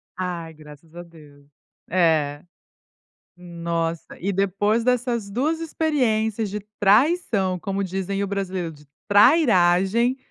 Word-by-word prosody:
Ai, 175 Hz, -3 st, -5 dB
graças 155 Hz, +1 st, -16 dB
a 175 Hz, -, -8 dB
Deus. 150 Hz, -4 st, -18 dB, 0.4 s
É. 155 Hz, -4 st, +1 dB, 0.9 s
Nossa, 170 Hz, -2 st, -4 dB
e 195 Hz, +3 st, -2 dB
depois 200 Hz, +4 st, 0 dB
dessas 240 Hz, -3 st, 0 dB
2 295 Hz, +9 st, -1 dB
experiências 230 Hz, -10 st, 0 dB
de 210 Hz, +2 st, -4 dB, 0.2 s
traição, 210 Hz, -, +2 dB
como 195 Hz, +2 st, -3 dB
dizem 195 Hz, +1 st, -3 dB
o -, -, -2 dB
brasileiro: 190 Hz, -3 st, -3 dB
"De 150 Hz, -1 st, -17 dB, 0.2 s
'trairagem'", 205 Hz, -, +4 dB
195 Hz, 110 wpm, -23 LUFS, 170-225 Hz, 0.9 s, trairagem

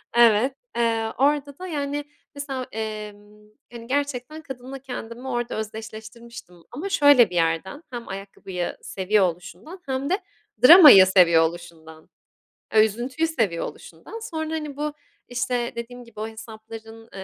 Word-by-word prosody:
Evet, 235 Hz, +3 st, +4 dB, 0.2 s
eee, 225 Hz, -1 st, 0 dB
orada 285 Hz, +1 st, +1 dB
da 370 Hz, -, -6 dB
yani 290 Hz, -2 st, -3 dB, 0.3 s
mesela, 270 Hz, -3 st, -5 dB
emm, 210 Hz, -1 st, -8 dB, 0.2 s
hani 235 Hz, -1 st, -10 dB
gerçekten 285 Hz, +2 st, -3 dB
kadınla 265 Hz, -1 st, -9 dB
kendimi 245 Hz, -1 st, -8 dB
orada 240 Hz, -2 st, -3 dB
özdeşleştirmiştim. 220 Hz, -1 st, -8 dB, 0.2 s
Ama 325 Hz, +11 st, -5 dB
şöyle 285 Hz, -, +6 dB
bir 180 Hz, -, -8 dB
yerden, 165 Hz, -, -1 dB
hem 240 Hz, -2 st, -7 dB
ayakkabıyı 195 Hz, -2 st, -6 dB
seviyor 195 Hz, +1 st, +1 dB
oluşundan 180 Hz, -, -7 dB
hem 265 Hz, +1 st, -3 dB
de 375 Hz, -, +1 dB, 0.5 s
dramayı 295 Hz, -, +10 dB
seviyor 170 Hz, -4 st, +5 dB
oluşundan, 160 Hz, -1 st, -7 dB, 0.7 s
üzüntüyü 240 Hz, +8 st, +2 dB
seviyor 220 Hz, -, -1 dB
oluşundan 455 Hz, -, -10 dB
sonra 320 Hz, -7 st, -5 dB
hani, 300 Hz, -3 st, -6 dB
bu, 300 Hz, 0 st, -3 dB, 0.4 s
işte 245 Hz, 0 st, -2 dB
dediğim 245 Hz, +1 st, -7 dB
gibi 235 Hz, -2 st, -14 dB
o 215 Hz, -, -3 dB
hesapların, 225 Hz, 0 st, -11 dB
235 Hz, 130 wpm, -23 LUFS, 210-280 Hz, 0.7 s, dramayı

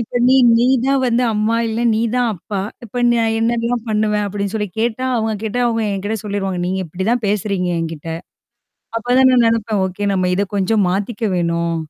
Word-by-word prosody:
இப்ப 235 Hz, +1 st, -2 dB
நீ 260 Hz, -, +5 dB, 0.2 s
நீ 240 Hz, -, +3 dB, 0.2 s
தான் 275 Hz, 0 st, +2 dB
வந்து 245 Hz, 0 st, +2 dB
அம்மா, 215 Hz, +2 st, +1 dB
இல்ல 225 Hz, +1 st, -2 dB
நீ 220 Hz, -, 0 dB, 0.2 s
தான் 245 Hz, -1 st, +2 dB
அப்பா, 195 Hz, +3 st, -5 dB, 0.2 s
இப்ப 235 Hz, -, -10 dB
ந -, -, +4 dB, 0.3 s
என்னல்லாம் 235 Hz, +1 st, 0 dB
பண்ணுவேன் 210 Hz, -1 st, +1 dB
அப்டின்னு 200 Hz, 0 st, -3 dB
சொல்லி 210 Hz, -2 st, -1 dB
கேட்டா 235 Hz, +2 st, -1 dB
அவங்க 220 Hz, -1 st, 0 dB
கேட்டா 220 Hz, +2 st, -2 dB
அவங்க 230 Hz, -1 st, 0 dB
என்கிட்ட 205 Hz, +3 st, -3 dB
சொல்லிருவாங்க. 200 Hz, -3 st, -3 dB
நீங்க 185 Hz, +2 st, -1 dB
இப்டிதான் 190 Hz, +9 st, -1 dB
பேசுறீங்க 200 Hz, -2 st, -1 dB
என்கிட்ட. 165 Hz, -1 st, -5 dB, 0.9 s
அப்பதான் 250 Hz, +3 st, +3 dB
நான் 245 Hz, -2 st, +4 dB
நெனப்பேன். 225 Hz, -3 st, +1 dB
ஓகே 190 Hz, +2 st, -5 dB
நம்ம 185 Hz, -1 st, +1 dB
இத 195 Hz, +2 st, +1 dB
கொஞ்சம் 200 Hz, +2 st, +2 dB
மாத்திக்க 205 Hz, +5 st, -3 dB
வேணும். 170 Hz, -1 st, 0 dB
215 Hz, 175 wpm, -18 LUFS, 195-230 Hz, 0.9 s, நீ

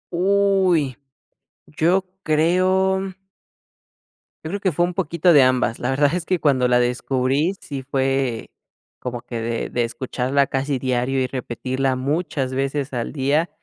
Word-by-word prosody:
Uy. 190 Hz, -6 st, +2 dB, 0.7 s
Yo 175 Hz, +5 st, +1 dB, 0.2 s
creo 185 Hz, +4 st, +2 dB, 1.3 s
yo -, -, -3 dB
creo 200 Hz, +2 st, -3 dB
que 185 Hz, -5 st, 0 dB
fue 175 Hz, -, +2 dB
un 180 Hz, -, -4 dB
poquito 170 Hz, 0 st, +2 dB
de 145 Hz, -4 st, +7 dB
ambas. 130 Hz, -2 st, +2 dB
La 125 Hz, -, -2 dB
verdad 145 Hz, +3 st, +2 dB
es 180 Hz, -2 st, -2 dB
que 185 Hz, -, +1 dB
cuando 130 Hz, -5 st, +2 dB
la 125 Hz, 0 st, +3 dB
descubrí, 130 Hz, +6 st, 0 dB
sí 140 Hz, -2 st, -6 dB
fue 135 Hz, -3 st, -1 dB, 0.5 s
como 120 Hz, -1 st, -5 dB
que 120 Hz, -2 st, -6 dB
de 115 Hz, 0 st, -3 dB
de 120 Hz, -, 0 dB
escucharla 130 Hz, +3 st, -1 dB
casi 135 Hz, 0 st, -1 dB
diario 130 Hz, +1 st, 0 dB
y 130 Hz, -, 0 dB
repetirla 130 Hz, +1 st, -2 dB
muchas 135 Hz, -1 st, -2 dB
veces 135 Hz, +1 st, -2 dB
al 120 Hz, -1 st, -3 dB
día. 145 Hz, +4 st, +1 dB
140 Hz, 145 wpm, -21 LUFS, 130-170 Hz, 1.3 s, de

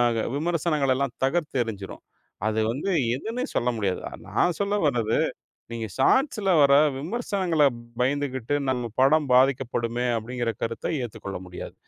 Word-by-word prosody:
க -, -, 0 dB, 0.2 s
விமர்சனங்களெல்லாம் 145 Hz, -5 st, 0 dB
தகர்த்து 150 Hz, 0 st, 0 dB
எறிஞ்சிடும். 100 Hz, -4 st, -7 dB, 0.4 s
அது 110 Hz, 0 st, 0 dB
வந்து 135 Hz, +11 st, -2 dB, 0.3 s
எதுன்னே 225 Hz, -, -4 dB
சொல்ல 120 Hz, -, +1 dB
முடியாது. 100 Hz, -4 st, -1 dB, 0.3 s
நான் 175 Hz, -1 st, +1 dB
சொல்ல 200 Hz, 0 st, 0 dB
வரது, 115 Hz, -6 st, +1 dB, 0.5 s
நீங்க 115 Hz, -1 st, -4 dB
ஷார்ட்ஸ்ல 215 Hz, -, +2 dB
வர்ற 140 Hz, -1 st, +6 dB, 0.2 s
விமர்சனங்கள 185 Hz, -, 0 dB, 0.4 s
பயந்துகிட்டு 135 Hz, 0 st, 0 dB
நம்ம 125 Hz, -2 st, -1 dB
படம் 145 Hz, +1 st, +4 dB
பாதிக்கப்படுமே 125 Hz, -2 st, +2 dB
அப்டிங்குற 120 Hz, +1 st, -3 dB
கருத்த 115 Hz, +7 st, -2 dB
ஏத்துக் 120 Hz, -, -8 dB
கொள்ள 95 Hz, -2 st, -4 dB
முடியாது. 90 Hz, -, -8 dB
135 Hz, 125 wpm, -25 LUFS, 115-155 Hz, 0.5 s, வர்ற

